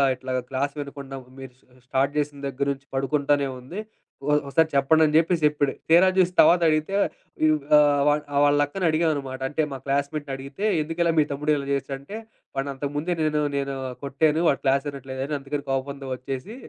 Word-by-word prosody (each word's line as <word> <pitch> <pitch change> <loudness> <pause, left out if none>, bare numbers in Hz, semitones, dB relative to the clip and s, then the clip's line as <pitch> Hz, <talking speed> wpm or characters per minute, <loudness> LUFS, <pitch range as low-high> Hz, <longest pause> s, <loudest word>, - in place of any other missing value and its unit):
ఇట్లాగా 130 0 -3
క్లాసు 140 +2 -1
వినకుండా 140 -1 -7 0.2
మీరు 135 -2 -10
స్ - - -31 0.2
స్టార్ట్ 135 +1 +1
చేసిన 145 -1 -1
దగ్గర 135 +1 -2
నుంచి, 135 0 -17
పడుకుంటానే 140 +1 +1
ఉంది. 165 +12 -7 0.5
ఒ - - +3 0.2
ఒకసారి 160 +3 +2
చెప్పండి" 155 +4 +4
అని 150 0 0
చెప్పేసి 165 +1 +2
చెప్పాడు. 145 -2 0 0.2
తీరా 175 +3 +7
చూసి 180 -1 +4
తర్వాత 175 +3 +7
అడిగితే 155 +4 0 0.5
ఇ - - +5 0.3
ఆహ్, 145 -1 +4
వా 145 - +4 0.3
వాళ్ళ 145 0 +3
అక్కన 190 +6 -5
అడిగావనమాట. 150 -5 0
అంటే 155 +2 0
మా 135 - -6
క్లాస్మెంట్ 140 +1 -1
అడిగితే 135 +8 -8 0.2
"ఎందుకలా 165 +2 0
మీ 150 - +4
తమ్ముడు 150 +2 0
ఇలా 140 -1 -4
జేసాడు?" 140 0 -2
అంటే, 200 +10 -8 0.4
"వాడిని 135 +1 -1
అంతకుముందే 145 +5 -2
నేను 150 -1 +1 0.2
నేను 140 0 -2 0.3
కొట్టాను. 150 +3 +1
వాడు 140 - 0
క్లాసు 135 +1 +2
వినట్లేదని 135 +1 -5
అందుకని 140 +1 -5
కోప్పందం 135 0 -3
ఒచ్చేసి 135 - -6
140 Hz, 175 wpm, -24 LUFS, 135-155 Hz, 0.5 s, తీరా